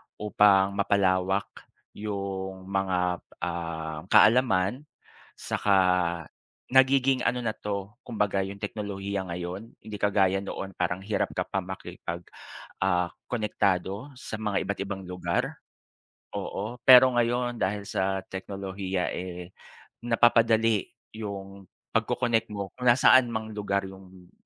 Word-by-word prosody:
upang 100 -2 +4
mapalawak 95 -1 +2 0.5
yung 95 -2 -5
mga, 95 -2 0 0.2
ah, 80 -2 -3
kaalaman, 120 +3 +4 0.5
saka 100 -2 +1 0.9
nagiging 130 0 +4
ano 125 +1 0
na - - +2
'to 100 0 -5
kumbaga 105 -3 0
yung 100 +1 -8
teknolohiya 100 -2 -4
ngayon 90 +5 -6
hindi 105 -1 -7
kagaya 95 -2 +2
noon 95 0 -5
parang 90 +1 -1
hirap 105 +2 -1
ka - - 0
pa 95 - -2
makipag, 90 -2 -7 0.6
ah, 90 -2 +2 0.2
konektado 105 +1 -1
sa - - -7
mga 105 -2 0
iba't 100 - -3
ibang 100 -1 -5
lugar, 90 0 -2 0.8
oo. 110 +5 -4
Pero 130 0 +9
ngayon 120 0 +1
dahil 100 +1 -1
sa 95 0 0
teknolohiya 95 -1 -3
eh 90 0 -6 0.5
napapadali 115 -2 +3 0.3
yung 100 -2 -7 0.3
pag-co-connect 115 -2 +1
mo 100 -2 -4
kung 125 - -4
nasaan 130 +1 +6
mang 110 0 -3
lugar 100 -1 -1
yung 95 -1 -13
100 Hz, 115 wpm, -27 LUFS, 95-110 Hz, 0.9 s, Pero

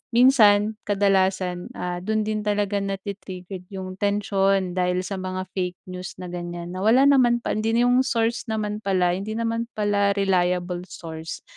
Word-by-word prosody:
minsan, 220 -4 +5
kadalasan, 190 -3 +1
ah, 180 0 -3
dun 215 +3 -1
din 215 0 -2
talaga 205 -1 0
na-tri-triggered 195 -2 -6
yung 185 -1 -7
tensyon 195 -2 +1
dahil 180 0 0
sa 195 +1 -4
mga 185 0 -3
fake 180 -2 -2 0.2
news 180 0 -7
na 180 - -6
ganyan, 175 0 -6
na - - -4
wala 245 +5 +5
naman 245 -4 +4
pa - - -1
hindi 225 +1 0
yung 245 +1 +4
source 230 -1 0
naman 210 -1 -2
pala, 185 -3 +2
hindi 210 +3 -4
naman 230 0 -1
pala 205 -1 +2
reliable 180 -2 0
source. 160 -1 -8
195 Hz, 155 wpm, -24 LUFS, 180-215 Hz, 0.2 s, minsan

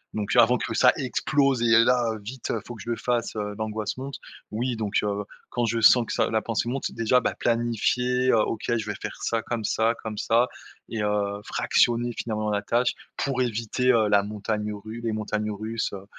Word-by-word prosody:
donc 105 +1 -1
avant 120 +1 +6
que 115 - -3
ça 125 +2 +6
explose 135 -1 +1
et 115 0 +6
là 120 -2 +2
vite 120 +5 -6
il 115 - -1
faut 120 - -7
que 110 - -9
je 120 0 -1
fasse, 120 -1 -1
heu, 105 -1 -3
l'angoisse 110 0 -3
monte. 135 +1 -6 0.3
Oui, 120 +3 -1
donc 110 -3 -1
heu, 105 0 -1 0.3
quand 120 -1 0
je 115 0 0
sens 120 +2 +7
que - - -3
ça - - +1
la 110 - +2
pensée 115 +1 -1
monte, 135 +2 -2
déjà, 115 +2 +2
bah, - - -1
planifier, 120 +2 +1
heu, - - +4
OK, 110 - -2
je 115 -2 0
vais 105 - -3
faire - - -5
ça 115 -1 0
comme 115 0 -3
ça, 110 +2 +1
comme 110 -1 -5
ça 115 +3 +3 0.4
et 110 - -3
heu, 105 -1 -1
fractionner 120 0 +2
finalement 110 -2 -2
la 100 0 0
tâche 120 +3 +1 0.2
pour 135 -2 -1
éviter 120 +1 +1 0.2
la 100 -1 +5
montagne 105 +1 -3
ru 110 +3 -8
les 115 -1 -1
montagnes 105 0 -2
russes, 110 +2 -3
heu 100 -1 -7
115 Hz, 205 wpm, -25 LUFS, 105-120 Hz, 0.4 s, sens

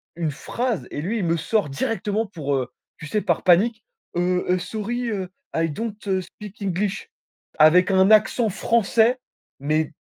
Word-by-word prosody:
une 165 -2 -1
phrase 235 - -3
et 145 - -4
lui, 205 +9 -2
il 190 - -1
me 165 0 +1
sort 200 +1 0
directement 210 +9 -1
pour, 155 -8 -3
heu, 130 -2 -1 0.3
tu 150 - -8
sais, 210 +7 0
par - - 0
panique: 215 +6 +3 0.3
«Heu 180 +1 +1
heu, 180 0 +3
sorry. 230 +5 -3
Heu, 190 -4 -3 0.3
I 165 0 +1
don't, 220 +7 -4
heu, 190 -1 +1
speak 205 +3 -12
English» 200 - -2 0.5
avec 180 +5 +6
un 190 +1 +4
accent 220 +2 +4
français 230 +4 +2 0.4
mais 155 +3 0
190 Hz, 165 wpm, -23 LUFS, 170-220 Hz, 0.5 s, avec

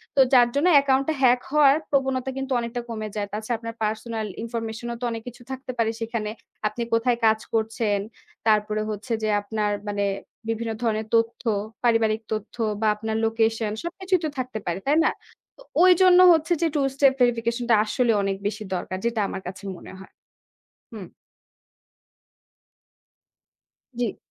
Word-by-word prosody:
তো - - +2
যার 245 -1 +7
জন্য 290 +5 +3
account 270 -1 +2
-টা 315 - +1
hack 245 0 +5
হওয়ার 285 -2 +6
প্রবণতা 265 -2 0
কিন্তু 270 0 -4
অনেকটা 235 +1 -4
কমে 215 -2 -4
যায়। 205 -1 -2
তাছাড়া 220 +2 -2
আপনার 230 0 -7
personal 220 0 -2 0.2
information 230 0 -5
-ও 235 - -4
তো - - -1
অনেক 225 -1 -4
কিছু 245 0 -9
থাকতে 265 0 -5
পারে 230 -1 +2
সেখানে। 225 -2 -3 0.4
আপনি 215 +3 -5
কোথায় 235 +1 +2
কাজ 220 0 +4
করছেন, 220 -2 0 0.5
তারপরে 215 0 +2
হচ্ছে 215 +3 -6
যে 215 - +1
আপনার 210 0 -2 0.2
মানে 205 0 -1 0.5
বিভিন্ন 225 0 -2
ধরনের 220 -1 0
তথ্য, 230 0 +1 0.4
পারিবারিক 225 -2 +2
তথ্য 215 0 -5 0.3
বা 220 - +2
আপনার 220 +1 -4
location 225 -1 +1
সবকিছুই 370 +1 -1
তো - - 0
থাকতে 250 -4 -3
পারে। 175 +1 -2
তাই 295 +3 +3
না? - - +3 0.5
তো - - -17 0.2
ওইজন্য 365 0 +6
হচ্ছে 325 +2 +1
যে 335 - +3
two 280 -2 +2
step 275 -1 +5
verification 235 0 +1
-টা 230 - +7
আসলে 240 +2 +1
অনেক 195 0 -1
বেশি 215 +1 -4
দরকার 185 +1 -4
যেটা 235 -2 0
আমার 190 - -5
কাছে 190 +2 -8
মনে - - -11
হয়। 190 - -14 0.8
হুম। 195 -6 -8 2.9
জ্বী। 235 -4 -1
230 Hz, 160 wpm, -24 LUFS, 215-255 Hz, 2.9 s, যার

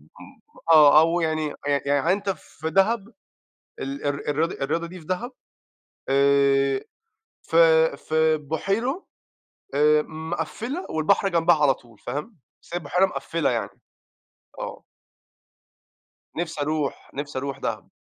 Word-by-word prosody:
م - - -17 0.3
آه، 150 -1 +8
أو 165 +2 +2
يعني 155 -2 -1
يع 140 -1 +2
يعني 145 +5 +2
أنت 200 0 -1
في 160 -4 -6
دهب، 205 +3 +1 0.6
ال 140 +2 -5
الر 145 0 0
الرياضة 160 +4 0
الرياضة 165 +4 -1
دي 180 +2 -10
في 155 - -16
دهب، 220 +8 -3 0.8
آآ 140 0 +3 0.6
في 160 -1 +4
في 160 0 +1
بُحيرة 195 - -2 0.7
آآ 150 +1 +4
مقفِّلة 165 - -5
والبحر 175 +5 +2
جنبها 170 -1 +4
على 140 -3 +5
طول 115 -4 -20
فاهم، 150 - -6 0.2
بس - - -16
هي - - 0
بحيرة 175 +4 +2
مقفِّلة 165 -3 -2
يعني. 115 -4 -2 0.9
آه. - - -6 1.5
نفسي 165 -3 -3
أروح، 150 -1 -2
نفسي 145 -1 -4
أروح 140 0 -4
دهب. - - -4
160 Hz, 125 wpm, -24 LUFS, 145-175 Hz, 1.5 s, آه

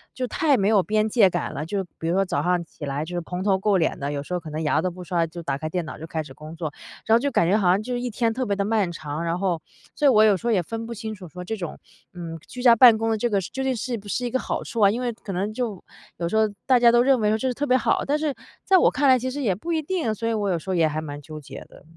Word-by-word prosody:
就 255 - -2
太 290 +4 +2
没 195 0 +1
有 210 -3 +5
边 215 +2 +1
界 210 -4 +5
感 - - -3
了。 150 - -4
就 195 +3 -2 0.2
比 165 - -3
如 170 - +1
说 195 - +3
早 - - -1
上 180 -1 +1
起 160 -2 -10
来 140 +2 -2
就 175 +3 -6
是 175 - -1
蓬 180 +2 -5
头 195 -2 +3
垢 195 +1 +2
脸 165 - 0
的， 140 +1 -3
有 140 0 -3
时 180 - -7
候 180 - 0
可 160 - -9
能 155 +1 -4
牙 155 +1 +2
都 185 - 0
不 180 +1 -9
刷， 170 -1 0
就 170 +1 -9
打 135 -3 -2
开 155 +2 -4
电 180 +1 -2
脑 150 - -8
就 160 - -7
开 160 -1 -3
始 135 - -12
工 155 +4 -10
作。 160 -3 -4 0.3
然 220 - +3
后 - - +5
就 285 +3 0
感 170 - +2
觉 200 - +3
好 195 -4 +1
像 190 +4 +3
就 250 +2 -4
是 245 - -1
一 250 - -2
天 230 0 0
特 255 +2 -2
别 200 -2 0
地 200 - 0
漫 205 -4 +1
长， 155 -1 -5
然 170 +1 -1
后 180 -4 0 0.3
所 295 - -1
以 - - +8
我 215 -4 +6
有 205 -3 +5
时 235 - -5
候 - - +3
也 185 -4 +2
分 225 +6 -5
不 235 - -5
清 220 0 -5
楚 185 -3 -11
说 180 +2 -8
这 220 +5 -3
种， 175 -5 -6 0.4
嗯 165 -2 -7
居 250 - -8
家 240 -2 +7
办 230 -1 +8
公 225 0 -1
的 220 - +1
这 240 +2 0
个 200 -2 +1
是 170 - -7
究 265 - -3
竟 265 -1 0
是 235 +1 -3
不 205 - -12
是 250 +5 -2
一 240 - -1
个 260 - 0
好 - - -3
处 230 - -5
啊。 200 0 +6
因 240 - -3
为 245 -1 -1
可 215 -3 -8
能 195 +4 -1
就 220 -6 -4 0.3
有 170 -1 -2
时 220 - -2
候 220 0 +4 0.2
大 255 -2 +5
家 235 -1 +6
都 240 - +5
认 260 0 +4
为 210 -1 +2
说 220 - +2
这 260 - -2
是 255 - 0
特 290 - -1
别 255 - +3
好， - - +1
但 290 +2 +1
是 305 -2 0 0.3
在 385 - +5
我 - - +4
看 280 +1 +2
来 255 - +7
其 255 +1 -3
实 290 +2 -4
也 200 -8 +1
不 335 - -4
一 315 - +1
定， 310 -8 -1
所 230 +2 -3
以 - - 0
我 205 -3 -1
有 170 - 0
时 160 - -10
候 185 - +1
也 165 -2 +3
还 155 +1 -3
蛮 145 -2 -7
纠 155 +1 -9
结 135 -1 -10
的。 - - -17
200 Hz, 370 characters per minute, -24 LUFS, 170-235 Hz, 0.4 s, 以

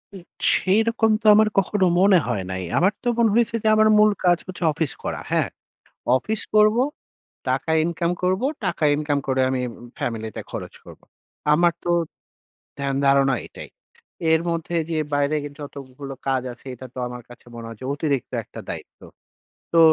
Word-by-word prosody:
উ - - -7 0.4
সেইরকম 225 +3 +2
তো - - -24
আমার 215 0 +5
কখনো 190 0 +1
মনে 190 -1 +6
হয় 105 -6 -1
নাই। 95 0 -3
আমার 190 +4 +3
তো - - -3
মনে 230 -2 +4
হইছে 230 -1 +2
যে - - +1
আমার 215 0 +5
মূল 210 0 +6
কাজ 175 -1 +5
হচ্ছে 180 -1 -6
অফিস 155 -3 -1
করা। - - -3
হ্যাঁ? - - +2 0.7
অফিস 215 - -2
করবো, 215 +3 +5 0.7
টাকা 160 - 0
ইনকাম 170 +1 -1
করবো, 190 +7 +1 0.2
টাকা - - -2
ইনকাম 145 -1 0
করে 130 0 +1
আমি 130 -1 -1
উম 120 - -13
ফ্যামিলিতে 110 -2 -4
খরচ - - -6
করবো। - - -14 0.5
আমার 170 +2 +4
তো 175 - -3 0.9
ধ্যান, 140 -1 -1
ধারণা 135 -1 +4
এটাই। - - -10 0.6
এর 160 - +4
মধ্যে 170 +1 -2
যে 160 - 0 0.2
বাইরে 145 +1 +1
কিন্তু 145 0 -9
যতগুলো 135 0 -9
কাজ 130 -1 +1
আছে 130 - -16
এটা 130 +2 -9
তো - - -8
আমার 125 0 -8
কাছে 120 0 -15
মনে 115 -1 -7
হয় 115 - -9
যে - - -8
অতিরিক্ত 145 -3 -2
একটা - - -10
দায়িত্ব। - - -8 0.7
তো 170 - +4
160 Hz, 170 wpm, -23 LUFS, 135-195 Hz, 0.9 s, মনে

